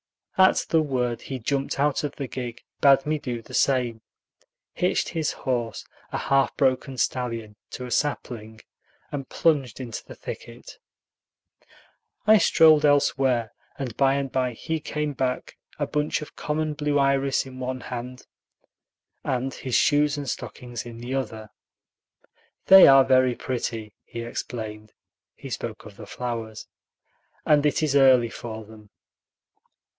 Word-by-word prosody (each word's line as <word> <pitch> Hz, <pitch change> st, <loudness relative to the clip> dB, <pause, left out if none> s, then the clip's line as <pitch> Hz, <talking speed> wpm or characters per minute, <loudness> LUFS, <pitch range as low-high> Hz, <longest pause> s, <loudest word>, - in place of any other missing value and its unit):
At 190 Hz, 0 st, +4 dB
the 160 Hz, -, +4 dB
word 125 Hz, -5 st, -1 dB
he 135 Hz, -, -5 dB
jumped 135 Hz, +3 st, -2 dB
out 145 Hz, +1 st, +1 dB
of 145 Hz, -, -3 dB
the 140 Hz, -, -4 dB
gig, 120 Hz, -2 st, -6 dB, 0.2 s
bade 135 Hz, -1 st, +5 dB
me 155 Hz, 0 st, 0 dB
do 120 Hz, -4 st, -5 dB
the -, -, -14 dB
same, 125 Hz, -4 st, +1 dB, 0.7 s
hitched -, -, 0 dB
his 160 Hz, -2 st, -1 dB
horse, 120 Hz, -5 st, -3 dB, 0.3 s
a -, -, -2 dB
half 135 Hz, 0 st, +1 dB
broken 130 Hz, -1 st, +1 dB
stallion, 115 Hz, -5 st, -2 dB
to 125 Hz, -, -6 dB
a 125 Hz, -, -8 dB
sapling, 110 Hz, -7 st, -2 dB, 0.5 s
and 140 Hz, -2 st, -5 dB
plunged 140 Hz, -8 st, +1 dB
into 120 Hz, -4 st, -6 dB
the -, -, -12 dB
thicket. -, -, -9 dB, 1.5 s
I 215 Hz, 0 st, +7 dB
strolled 155 Hz, -4 st, +6 dB
elsewhere; 135 Hz, -5 st, +2 dB, 0.2 s
and 125 Hz, -5 st, -5 dB
by 135 Hz, 0 st, +3 dB
and 140 Hz, -2 st, -2 dB
by 130 Hz, -2 st, 0 dB
he 160 Hz, +7 st, -3 dB
came 150 Hz, 0 st, -3 dB
back, 130 Hz, -1 st, -3 dB, 0.2 s
a -, -, 0 dB
bunch 150 Hz, +1 st, -1 dB
of -, -, -13 dB
common 155 Hz, 0 st, -2 dB
blue 145 Hz, -1 st, 0 dB
iris 140 Hz, -1 st, +2 dB
in 130 Hz, -1 st, -10 dB
one 130 Hz, 0 st, -4 dB
hand, 125 Hz, +1 st, -7 dB, 1.0 s
and 130 Hz, +1 st, -1 dB
his 130 Hz, -2 st, -3 dB
shoes 145 Hz, 0 st, +3 dB
and 145 Hz, -1 st, -5 dB
stockings 120 Hz, -2 st, -5 dB
in 120 Hz, -1 st, -9 dB
the 120 Hz, +2 st, -6 dB
other. 110 Hz, -5 st, -4 dB, 1.1 s
"They 190 Hz, 0 st, +10 dB
are 135 Hz, -1 st, +8 dB
very 130 Hz, -1 st, +4 dB
pretty," 115 Hz, -5 st, -4 dB
he 115 Hz, -, -7 dB
explained 110 Hz, -2 st, -6 dB, 0.4 s
(he -, -, -10 dB
spoke -, -, -5 dB
of -, -, -12 dB
the -, -, -10 dB
flowers), 115 Hz, -3 st, -5 dB, 0.8 s
"and 150 Hz, -1 st, +4 dB
it 150 Hz, +1 st, +1 dB
is 145 Hz, -2 st, +1 dB
early 130 Hz, -4 st, +6 dB
for 110 Hz, -2 st, -7 dB
them." 105 Hz, -1 st, -15 dB
130 Hz, 145 wpm, -25 LUFS, 120-145 Hz, 1.5 s, They